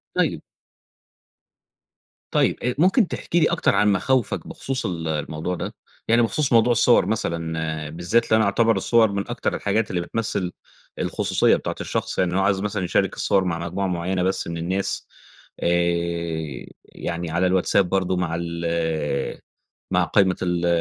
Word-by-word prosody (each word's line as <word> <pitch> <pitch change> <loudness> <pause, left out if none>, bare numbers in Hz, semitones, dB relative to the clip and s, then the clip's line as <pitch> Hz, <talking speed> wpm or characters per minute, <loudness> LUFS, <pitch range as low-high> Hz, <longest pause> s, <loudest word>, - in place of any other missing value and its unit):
طيب - - +1 1.9
طيب، - - +1
أ 125 0 0
ممكن 190 - +4
تحكي 175 - -1
لي 160 - +4
أكتر - - +2
عن 105 +1 +4
مخاوفك 120 +4 0
بخصوص 130 -3 -4
ال 85 -4 -3
الموضوع 80 +3 -3
ده؟ - - -5 0.3
يعني 115 +1 +4
بخصوص 120 +4 +1
موضوع 115 +1 +5
الصور 120 +1 +4
مثلًا 80 -6 -2
بالذات 85 +9 +1
اللي 110 - +3
أنا 110 - +3
أعتبر 115 +2 +3
الصور 110 +1 +3
من 100 0 -3
أكتر - - -2
الحاجات 105 +2 0
اللي 90 -1 -1
بتمثل 95 -3 -2 0.5
الخصوصية - - +2
بتاعة - - -4
الشخص. - - -2
يعني 90 0 +1
هو - - +2
عايز 95 0 +2
مثلًا 105 -2 -2
يشارك 90 - +1
الصور 95 -1 +2
مع 85 -2 -2
مجموعة 90 +3 -2
معيّنة 90 +1 -1
بس 95 -1 0
من 85 0 -4
الناس 95 +4 -2 0.6
آآ 85 -4 -1 0.2
يعني 85 -1 -5
على 90 +2 +2
الواتساب 95 0 +2
برضه 95 -1 0
مع 85 -2 -1
ال 85 -4 -2 0.5
مع - - +3
قايمة 95 -2 +2
ال 90 -1 0
90 Hz, 155 wpm, -23 LUFS, 85-105 Hz, 1.9 s, موضوع